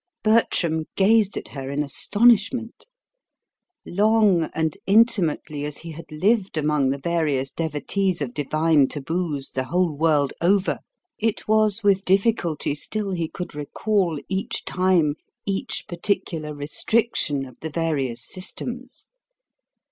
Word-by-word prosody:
Bertram 170 -8 +2
gazed 205 0 +3
at - - -6
her 135 -2 -6
in 145 +2 -1
astonishment. 230 - +2 1.0
Long 205 -4 +3
and 160 -1 0
intimately 190 -9 +2
as 150 0 -4
he 165 0 -8
had 165 +1 -10
lived 190 +3 +1
among 150 -3 +1
the 140 - 0
various 145 -4 -1
devotees 170 +4 -1
of 135 -5 -3
divine 155 0 +2
taboos 150 -1 -3
the 130 0 -2
whole 175 +2 0
world 150 -2 +2
over, 190 +3 +2 0.4
it 220 -1 -1
was 215 0 +2
with 200 -1 +3
difficulty 190 -7 +1
still 200 +7 -3
he 170 -3 -1
could 180 +2 -7
recall, 170 +3 -1
each 190 +1 -3
time, 180 -5 +2 0.3
each 195 -1 -2
particular 170 -3 -2
restriction 150 0 0
of 130 - -14
the 160 - -5
various 145 -7 -2
systems. 245 +7 -5
170 Hz, 125 wpm, -23 LUFS, 150-200 Hz, 1.0 s, gazed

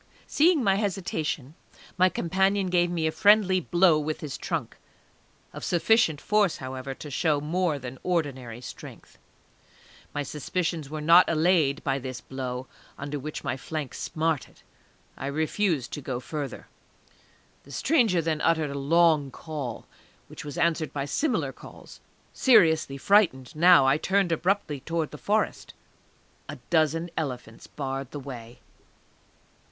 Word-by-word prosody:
Seeing 315 -2 +3
my 195 -2 +3
hesitation, 170 - -3 0.4
my 185 0 +4
companion 190 +2 0
gave 175 -1 +3
me 170 -2 -1
a 160 - +1
friendly 200 0 +4
blow 175 -2 +3
with 155 +1 -3
his 145 -3 -5
trunk, - - -4 0.8
of - - -8
sufficient 175 -3 +2
force, 205 -2 +1
however, 130 0 -6
to 150 - -9
show 150 +1 +1
more 160 +1 0
than 130 -1 -8
ordinary 130 -9 -2
strength. - - -11 0.9
My 145 - -3
suspicions 155 +1 -3
were 155 0 -5
not 170 +4 +6
allayed 160 -3 +2
by 135 -1 0
this 130 -1 -6
blow, 130 -1 -5 0.3
under 145 +1 -5
which 150 +3 -6
my - - -2
flank 150 +1 -5
smarted; 160 -2 -3 0.5
I 135 - -5
refused 155 - -1
to 145 - -5
go 130 -2 -4
further. 140 0 -6 1.0
The 140 - -16
stranger 215 - +2
then 160 -1 -1
uttered 160 -3 +1
a 140 - -4
long 155 0 +3
call, 140 -4 -6 0.4
which - - -9
was 145 -2 -7
answered 165 -2 +1
by 140 -1 -3
similar 250 - -1
calls. - - -13 0.3
Seriously 160 - +4
frightened 155 - +2
now, 175 -2 +6
I 135 +2 +4
turned 195 -1 +1
abruptly 165 -3 0
towards 165 +2 -3
the 150 - -9
Forest. 215 +1 -1 0.7
A - - -5 0.2
dozen 165 +1 +1
elephants 125 -7 -5
barred 135 -2 -5
the 145 - -7
way. 125 -4 -10
155 Hz, 140 wpm, -26 LUFS, 140-180 Hz, 1.0 s, not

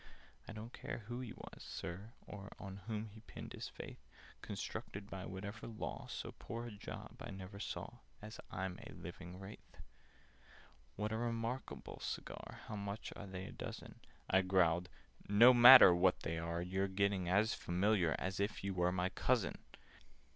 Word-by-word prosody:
"I - - -6
don't 110 +2 -8
care 115 - -5
who 120 +3 -4
he 125 -4 -5
was, - - -10
Sir, 100 +7 -6
or 100 0 -8
On 95 -1 -7
whom 110 -1 -2
he 110 - -11
pinned 110 - -9
his - - -5
faith! - - -9 0.4
Constructed 100 +1 -5
by 95 -1 -5
whatever 100 +4 -6
law, 110 -2 -5
So - - -4
poor 115 +1 -5
a 120 - -6
job 105 -1 -8
I - - -7
never 95 +1 -8
saw, 115 +2 -5 0.2
As 105 +1 -9
I'm 95 -1 -3
a - - -10
living 90 +1 -8
Wraith! 95 +2 -11 1.2
"What 105 +1 -2
a 110 - 0
re 120 +1 0
markable 115 +3 -4
cigar! - - -6
How 105 - -5
much 100 +1 -4
are 100 - -7
they 95 0 -5
a - - -7
dozen?" - - -7 0.3
I 95 - +5
growled 90 -2 +3 0.4
"No 115 +5 +9
matter 120 -5 +12
what 90 +1 +3
they 80 0 -2
are! 85 +1 -2
You're 95 +2 0
getting 95 -2 +1
as 105 +4 +4
familiar 90 -2 +2
As 95 +1 -3
if 100 0 -1
you 100 0 -1
were 90 -1 +2
my 90 0 0
cousin! 95 - +1
100 Hz, 170 wpm, -37 LUFS, 95-110 Hz, 1.2 s, matter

